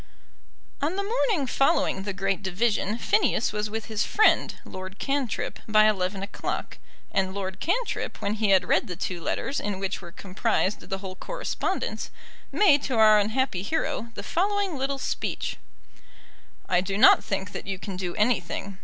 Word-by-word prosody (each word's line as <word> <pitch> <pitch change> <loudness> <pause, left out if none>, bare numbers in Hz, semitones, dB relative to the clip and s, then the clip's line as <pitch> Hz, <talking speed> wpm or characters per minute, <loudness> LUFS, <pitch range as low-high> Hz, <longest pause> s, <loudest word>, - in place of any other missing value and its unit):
On 310 +6 0
the 400 - -1
morning 425 - +1
following 265 -6 +2
the 200 +1 -3
great 195 -1 -1
division 210 +2 0
Phineas 215 0 +2
was 210 0 -1
with 225 +1 -4
his 215 -2 -1
friend, 435 - +3
Lord 190 +1 -8
Cantrip, 275 -4 -2
by 215 0 +6
eleven 190 -1 0
o'clock; 200 - -4 0.3
and 190 0 0
Lord 190 -1 -4
Cantrip, 455 +8 -1
when 205 - -1
he 215 -1 0
had 190 -1 +4
read - - +2
the 180 - -4
two 180 0 -4
letters 275 - -2
in 200 -2 -3
which 195 0 -3
were 175 -2 -10
comprised 200 +2 -1
the 195 - -1
whole 190 -1 -7
correspondence, - - -3 0.4
made 305 -9 +5
to 260 - -1
our 215 -1 +7
unhappy 215 -1 0
hero 235 -1 -2
the - - -6
following 400 0 0
little 275 +1 -1
speech. - - -3 1.1
"I 180 - +3
do 195 +1 -3
not - - +7
think 195 0 -3
that - - -7
you 195 -1 -2
can 195 0 -6
do 180 -1 -4
anything. 200 -3 -1
210 Hz, 165 wpm, -26 LUFS, 190-265 Hz, 1.1 s, our